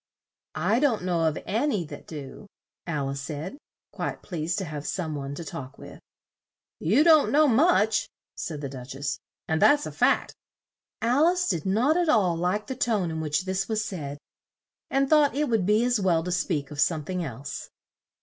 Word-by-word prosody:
"I 190 +9 +2
don't 255 -9 +2
know 175 -3 +1
of 155 -1 +1
an 235 +9 0
y 200 - -1
that - - -10
do," 150 +5 -9 0.4
Al 145 -5 -1
ice 140 0 -4
said, 155 - -6 0.3
quite - - -4
pleased 170 -2 -3
to 195 - -2
have 150 -2 -6
some 165 -5 -2
one 140 -1 -5
to 170 - -7
talk 135 -2 -7
with. - - -11 0.8
"You 220 - +3
don't 315 -3 +6
know 300 +1 +5
much," 235 - +3 0.3
said 155 -3 -5
the 140 - -3
Duch 130 -1 -8
ess; 140 +1 -3 0.3
"and 160 0 0
that's 290 0 +5
a - - -5
fact." - - +2 0.7
Al 260 +8 +4
ice 360 +1 +1
did 165 - -1
not 245 - +3
at 350 -2 +1
all 190 - +3
like 180 +5 -1
the 260 - -5
tone 210 -9 0
in 160 0 -3
which 155 +4 -1
this 190 +1 -2
was 215 -1 0
said, 145 -8 -5 0.7
and 275 0 +2
thought 295 -1 +4
it 295 -1 0
would 220 -6 +1
be 215 +3 +4
as 245 -2 +2
well 175 -4 +2
to 180 - -3
speak 155 -5 -1
of 145 - -7
some 155 -4 +1
thing 180 +1 -2
else. 140 -1 -6
185 Hz, 195 wpm, -26 LUFS, 155-240 Hz, 0.8 s, don't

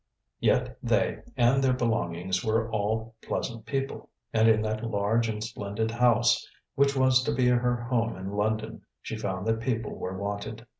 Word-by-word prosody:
Yet - - +1
they - - +1 0.2
and 125 +3 +4
their 130 -1 +4
belongings 95 -7 -1
were 110 0 0
all 110 +2 -1
pleasant 115 -1 -4
people; 135 +2 -3 0.2
and 110 0 +5
in 110 -1 +4
that 110 +1 -2
large 115 +1 +1
and 105 -1 -3
splendid 110 0 -3
house 120 0 +3 0.2
which 140 0 +3
was 130 -1 +4
to - - -1
be 125 -1 +3
her 125 0 +2
home 120 -1 -1
in 95 +1 -5
London, 110 +2 -1 0.2
she - - -4
found 95 -3 -3
that 115 0 +1
people 115 -2 -2
were 95 +1 -5
wanted. 100 +3 -4
115 Hz, 165 wpm, -28 LUFS, 105-120 Hz, 0.2 s, and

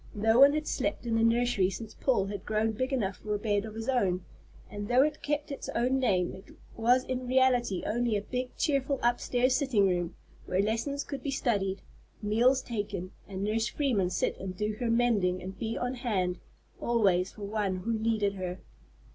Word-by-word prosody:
No 225 +3 +3
one 280 +1 +8
had 305 0 -1
slept 305 - -2
in 230 - -1
the 225 - +2
nursery 230 -4 +3
since 220 +2 -7
Paul 245 -8 +1
had 200 -1 -5
grown 215 +1 0
big 255 +5 -2
enough 200 -8 -1
for 210 -1 -3
a - - 0
bed 205 -1 0
of 215 -1 -8
his 225 0 -5
own; 190 -9 +1 0.4
and 205 0 -6
though 250 +3 +5
it 300 0 -1
kept 295 0 -2
its 280 - -6
own 255 +3 +2
name, 185 -8 +1
it 190 - -13 0.2
was 245 +3 +3
in 255 -1 -4
reality 250 -6 +2
only 235 -1 +1
a 200 - -4
big, 250 +2 -3
cheerful 275 -2 +1
upstairs 245 +1 +2
sitting 250 -8 +3
room, 175 -2 -1 0.3
where 185 - 0
lessons 230 +8 0
could 280 -2 -6
be 280 - -3
studied, 200 -8 -1 0.4
meals 240 +5 +3
taken, 205 -5 -4 0.2
and 195 -1 -5
Nurse 220 +2 +1
Freeman 235 -11 0
sit - - 0
and 185 -1 -6
do 210 +1 -1
her 240 -2 -1
mending 225 -6 +2
and 190 +1 -8
be 225 0 -2
on 245 +1 -2
hand 195 -8 -1 0.4
always 195 -6 +2
for 210 - -10
any 200 - -5
one 205 -3 0
who 185 +6 -2
wanted 215 -3 +1
her. 185 -2 -4
225 Hz, 195 wpm, -29 LUFS, 200-250 Hz, 0.4 s, one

